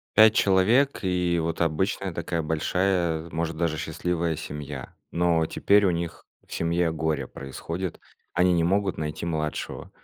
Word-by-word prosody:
5 110 0 +8
человек 110 +10 +3
и 90 -2 +1
вот 80 0 -3
обычная 90 +3 0
такая 85 0 -2
большая, 85 +1 0
может 80 0 -2
даже 80 -2 0
счастливая 85 0 -1
семья, 70 -3 -7 0.2
но 85 -1 +2
теперь 100 +5 +3
у - - +4
них 85 -1 -4 0.2
в - - -18
семье 85 0 +1
горе 80 -3 -1
происходит, 85 +6 -5 0.3
они 90 +1 +3
не 85 -1 +3
могут 95 +1 +1
найти 75 +2 -4
младшего. 75 -2 -3
85 Hz, 145 wpm, -26 LUFS, 80-90 Hz, 0.3 s, 5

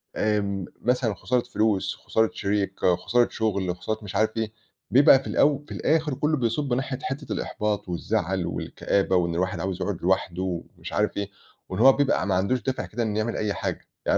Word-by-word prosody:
آمم، 100 -3 0 0.2
مثلًا 125 -1 +1
لو 100 - -3
خسارة 125 +4 0
فلوس، 110 -5 0
خسارة 110 -1 +1
شريك، 100 -1 -1 0.3
خسارة 120 0 +3
شغّل، 100 -5 -1
خسارة 110 +4 -3
مش 95 - -7
عارف 110 +1 +1
إيه. 110 -1 -1 0.4
بيبقى 135 0 +7
في - - -9
الأو 145 0 +2
في - - -14
الآخر 155 -2 +1
كلّه 150 +3 +1
بيصُبّ 125 +2 0
ناحية 130 +1 -2
حتة 140 +2 -4
الإحباط، 105 -3 -2
والزعل، 95 0 -1
والكآبة، 95 -1 0
وإن 85 -2 +1
الواحد 90 -1 -1
عاوز 95 0 -3
يقعد 100 -4 -2
لوحده، 95 0 0 0.4
ومش - - -8
عارف 105 -1 0
إيه، 100 0 -2 0.4
وإن 95 +2 -4
هو 135 +2 +8
بيبقى 140 -9 +1
ما 95 - +2
عندوش 105 +7 +1
دافع 130 -1 -2
كده، 115 +2 -3
إن 105 -1 -1
يعمل 110 +2 -1
أي 105 -2 0
حاجة. - - -4 0.2
يعني - - +2
110 Hz, 190 wpm, -25 LUFS, 95-125 Hz, 0.4 s, هو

